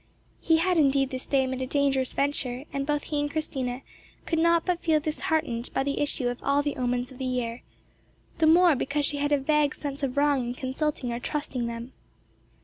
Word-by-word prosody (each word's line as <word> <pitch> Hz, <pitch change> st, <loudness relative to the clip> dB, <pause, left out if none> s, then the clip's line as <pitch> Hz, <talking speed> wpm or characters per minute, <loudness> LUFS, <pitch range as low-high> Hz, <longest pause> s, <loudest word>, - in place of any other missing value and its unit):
He 325 Hz, -1 st, +3 dB
had 350 Hz, +1 st, +2 dB
indeed 275 Hz, -2 st, +3 dB
this 260 Hz, 0 st, -5 dB
day 270 Hz, -2 st, +2 dB
made 260 Hz, 0 st, -3 dB
a 260 Hz, -, -2 dB
dangerous 275 Hz, -2 st, +1 dB
venture, 275 Hz, -3 st, -1 dB
and 275 Hz, 0 st, -2 dB
both 295 Hz, -1 st, 0 dB
he 300 Hz, -2 st, -2 dB
and 290 Hz, 0 st, 0 dB
Christina 265 Hz, -4 st, -3 dB, 0.4 s
could 325 Hz, -, 0 dB
not 335 Hz, 0 st, +3 dB
but 360 Hz, -2 st, 0 dB
feel 315 Hz, -2 st, +3 dB
disheartened 305 Hz, -5 st, -1 dB
by -, -, +2 dB
the 280 Hz, 0 st, -2 dB
issue 280 Hz, -3 st, 0 dB
of 245 Hz, 0 st, -3 dB
all 280 Hz, +1 st, +2 dB
the 290 Hz, -, -2 dB
omens 245 Hz, 0 st, -1 dB
of 260 Hz, -, -13 dB
the 260 Hz, -, -3 dB
year, 245 Hz, -2 st, -2 dB, 0.8 s
the 315 Hz, -, +4 dB
more 345 Hz, +1 st, +6 dB
because 280 Hz, +2 st, -1 dB
she 290 Hz, -, 0 dB
had 290 Hz, +1 st, -1 dB
a 290 Hz, -, +5 dB
vague 300 Hz, +1 st, +1 dB
sense 285 Hz, -1 st, -5 dB
of 275 Hz, -1 st, -2 dB
wrong 285 Hz, -2 st, +3 dB
in 240 Hz, -, -2 dB
consulting 260 Hz, 0 st, -2 dB
or 235 Hz, -, -3 dB
trusting 260 Hz, -3 st, -3 dB
them. 235 Hz, +2 st, -6 dB
280 Hz, 210 wpm, -27 LUFS, 255-300 Hz, 0.8 s, more